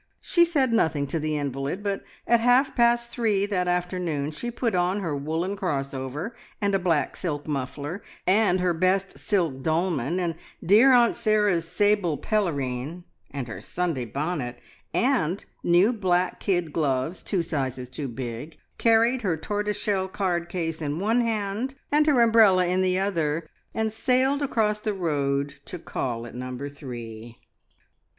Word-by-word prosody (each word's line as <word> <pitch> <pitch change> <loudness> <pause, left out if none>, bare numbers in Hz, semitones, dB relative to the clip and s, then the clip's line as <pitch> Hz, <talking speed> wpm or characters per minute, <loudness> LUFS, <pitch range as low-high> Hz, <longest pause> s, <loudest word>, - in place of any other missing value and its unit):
She 345 -1 +3
said 280 -8 +1
nothing 160 -9 +2
to 160 +4 -2
the 155 0 -1
invalid, 140 +6 -3
but 200 -1 -2 0.2
at 235 0 +4
half 250 +4 +3
past 235 0 +3
three 215 -5 +1
that 185 -3 -1
afternoon 175 -4 -1
she 240 +10 -5
put 235 -2 -1
on 180 +2 +1
her 165 -6 -2
woollen 160 +7 -2
crossover, 140 - -3 0.3
and 200 -1 0
a 195 - +3
black 170 -5 +1
silk 150 -5 -3
muffler, 145 +5 -4 0.2
and 190 -1 +3
her 180 -1 +2
best 185 +3 0
silk 170 - 0
dolman, 160 0 0
and 175 -2 -1 0.3
dear 220 +9 +7
Aunt 240 -2 +5
Sarah's 210 -6 +2
sable 205 -6 +2
pelerine, 150 - -2 0.3
and 135 -4 -5
her 115 - -7
Sunday 170 -8 -2
bonnet, 140 -1 -3 0.3
and 230 - +1 0.2
new 180 +7 +4
black 185 -4 0
kid 175 -6 0
gloves, 140 +1 0
two 185 -4 -1
sizes 130 -6 -3
too 135 +3 -5
big, 125 +4 -6 0.2
carried 230 +2 +4
her 180 -7 0
tortoiseshell 205 +2 -1
card 180 -3 -1
case 165 -3 -3
in 150 +1 -2
one 225 +5 +2
hand, 225 +3 -2 0.2
and 300 +1 +4
her 275 -5 +5
umbrella 215 -5 +5
in 180 +1 +1
the 185 0 +2
other, 170 -5 -1 0.3
and 220 -1 0
sailed 260 +4 +2
across 220 -6 +1
the 210 -1 -2
road 140 -5 -1
to 180 - -6
call 120 -7 -4
at 120 - -10
Number 125 +3 -5
Three. 120 -5 -9
180 Hz, 155 wpm, -25 LUFS, 145-210 Hz, 0.3 s, dear